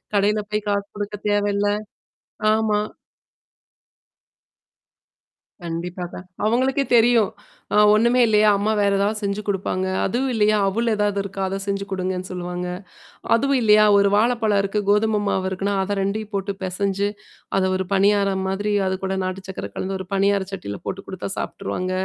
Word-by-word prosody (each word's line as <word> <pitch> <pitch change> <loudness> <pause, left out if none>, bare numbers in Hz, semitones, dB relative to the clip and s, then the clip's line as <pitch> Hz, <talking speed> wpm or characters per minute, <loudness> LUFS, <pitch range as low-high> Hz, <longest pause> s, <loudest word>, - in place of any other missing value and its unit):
கடையில 210 +1 +2
போய் 210 0 -2
காசு 200 0 0
குடுக்க 205 0 -4
தேவையில்ல. 205 0 +1 0.9
ஆமா. 215 -1 +1 2.8
கண்டிப்பாக. 175 +1 -5 0.3
அவங்களுக்கே 260 +5 +2
தெரியும். 235 -2 +5 0.4
அ - - +3 0.2
ஒண்ணுமே 235 +3 +3
இல்லையா 215 -1 +4
அம்மா 210 +2 +1
வேற 200 -1 +3
ஏதாவது 205 +2 0
செஞ்சு 200 +1 -1
குடுப்பாங்க. 190 -1 -1 0.2
அதுவும் 255 +6 0
இல்லையா, 215 -1 +3
அவுள் 230 +4 0
ஏதாவது 205 -1 0
இருக்கா? 195 0 -5
அத 195 +1 -3
செஞ்சு 200 0 -2
குடுங்கன்னு 185 -1 -3
சொல்லுவாங்க. 180 0 -4 0.7
அதுவும் 275 +2 +2
இல்லையா, 215 -1 +6
ஒரு 200 0 +4
வாழைப்பழம் 220 -2 +2
இருக்கு, 200 +2 -1
கோதும 210 +1 +3
மாவு 190 -1 0
இருக்குன்னா, 195 +2 -2
அத 205 +1 -2
2 210 +2 -2
போட்டு 200 0 -2
பெசஞ்சு, 195 +2 -1 0.5
அத 190 - +2
ஒரு 190 0 -2
பனியாரம் 195 -1 +2
மாதிரி 205 +2 -1 0.2
அது 190 0 -1
கூட 190 0 -1
நாட்டு 185 +1 -5
சர்கக்கர 185 - -6
கலந்து 190 +1 -3
ஒரு 190 - -7
பனியார 200 0 +2
சட்டியில 100 - -5
போட்டு 195 +1 -4
குடுத்தா 190 0 -5
சாபிட்டுருவாங்க. 185 -2 -3
200 Hz, 145 wpm, -22 LUFS, 190-215 Hz, 2.8 s, இல்லையா